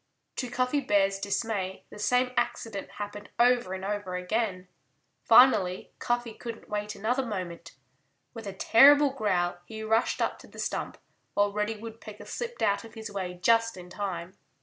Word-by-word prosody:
To 250 - -2
Cuffy 255 +3 +1
Bear's 195 -6 +2
dismay 200 -2 -2
the 210 - -10
same 250 +3 +2
accident 215 -5 -2
happened 205 0 -7
over 240 -5 +3
and 190 0 -6
over 205 -2 -3
again. 185 0 -2 0.6
Finally 205 -8 +5
Cuffy 240 -1 -1
couldn't 230 0 -8
wait 210 0 -3
another 245 +6 0
moment. 185 -7 -6 0.6
With 225 -3 -8
a - - -3
terrible 280 +8 +6
growl 185 -8 0
he 220 +3 -8
rushed 225 +2 +1
up - - -1
to - - -14
the - - -16
stump, - - -3 0.4
while 205 0 +2
Reddy 210 +1 -1
Woodpecker 220 -1 -10
slipped 480 0 -5
out 200 +2 +2
of 230 0 -13
his 220 -1 -7
way 185 -3 -4
just 230 -2 +3
in 180 0 -11
time. 185 -2 -4
210 Hz, 160 wpm, -28 LUFS, 195-235 Hz, 0.6 s, terrible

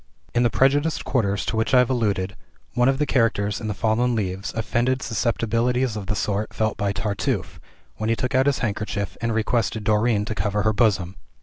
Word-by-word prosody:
In 120 - +2
the 120 - +4
prejudiced 145 +6 +2
quarters 100 -6 0
to - - -2
which 110 +3 +1
I - - +7
have 125 0 +4
alluded, 100 -6 0 0.4
one 125 +1 +3
of 135 - +1
the 150 - +1
characters 110 -6 +1
in 110 - -4
"The 105 - -2
Fallen 115 +4 +1
Leaves" 95 -2 -2
offended 120 +3 0
susceptibilities 115 +2 0
of 100 -3 -5
the 105 - -1
sort 105 +3 -2
felt 110 -1 0
by 100 0 -1
Tartuffe, 100 0 -2 0.4
when 110 +1 -2
he 115 - +3
took 125 +3 -3
out 130 +1 +3
his 140 - +2
handkerchief, 100 -2 -3
and 115 0 0
requested 110 -1 0
Dorine 105 0 +2
to 110 - -3
cover 105 +1 -1
her 110 0 +2
bosom. 100 -4 +1
110 Hz, 200 wpm, -23 LUFS, 105-120 Hz, 0.4 s, I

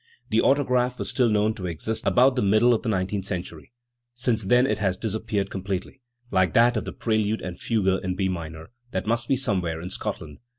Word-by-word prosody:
The 110 - +4
autograph 125 -3 +2
was - - -4
still 125 -3 +2
known 105 0 +2
to 95 -4 -5
exist 90 +7 -3
about 130 +1 +4
the 125 - +1
middle 110 +5 +4
of 115 - 0
the 115 - -3
nineteenth 95 -1 -1
century. 90 -3 -5 0.4
Since 120 -4 0
then 125 +5 +4
it 135 - 0
has 95 -3 0
disappeared 105 -2 -2
completely, 95 +6 -4 0.3
like 95 -4 +2
that 120 +1 +5
of 110 - -2
the - - -5
prelude 110 -1 -1
and 90 -1 -6
fugue 95 -5 0
in 90 0 -2
B 95 +1 0
minor, 80 -2 -6 0.2
that 95 -5 -3
must 115 +1 0
be 135 - +3
somewhere 95 -10 -1
in 90 +3 -7
Scotland. 75 -4 -5
105 Hz, 205 wpm, -25 LUFS, 95-120 Hz, 0.4 s, that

